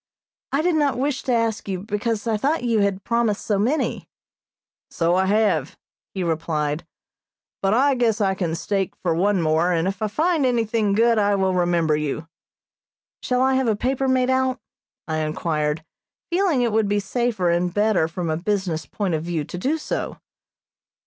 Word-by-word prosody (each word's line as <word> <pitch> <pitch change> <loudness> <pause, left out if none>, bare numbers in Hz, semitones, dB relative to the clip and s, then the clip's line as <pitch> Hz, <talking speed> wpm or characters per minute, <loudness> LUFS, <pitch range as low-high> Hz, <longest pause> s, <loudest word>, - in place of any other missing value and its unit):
"I 280 +3 +1
did 355 0 +2
not 290 -4 +1
wish 275 +1 -1
to 255 - -2
ask 230 -3 0
you, 185 -2 -3
because 210 +2 -2
I 225 -2 +1
thought 280 +7 0
you 230 -3 +2
had 200 -1 0
promised 235 -3 0
so 205 -2 +1
many." 260 +9 -1 0.8
"So 170 0 +1
I 190 +1 +2
have," 200 -8 +1 0.4
he 190 - -1
replied, 160 -2 -2 0.7
"but 195 +2 +2
I 275 +3 +4
guess 235 -4 +1
I 195 -2 +2
can 175 -4 -2
stake 195 +1 -2
for 170 -3 +2
one 190 +1 +1
more, 160 +3 +2
and 165 0 +1
if 195 +1 -3
I 215 - +1
find 315 - +1
anything 230 -4 +1
good 230 +1 +3
I 205 0 +3
will 190 -1 +1
remember 175 -3 +2
you." 150 +1 -3 0.9
"Shall 250 0 +1
I 265 0 +3
have 260 -1 +1
a 220 - +2
paper 265 +5 -1
made 260 0 +2
out?" 260 0 +1 0.5
I 160 -1 -1
inquired, 155 0 -1 0.5
feeling 345 -8 +2
it 235 - +1
would 220 -1 +2
be 205 +1 +1
safer 210 -3 0
and 175 +1 +1
better 205 -4 +2
from 165 0 -3
a 155 - 0
business 180 -3 -2
point 195 -5 -2
of 155 - 0
view 170 -3 -2
to 180 - -7
do 285 - 0
so. 310 - -4
205 Hz, 180 wpm, -23 LUFS, 175-240 Hz, 0.9 s, I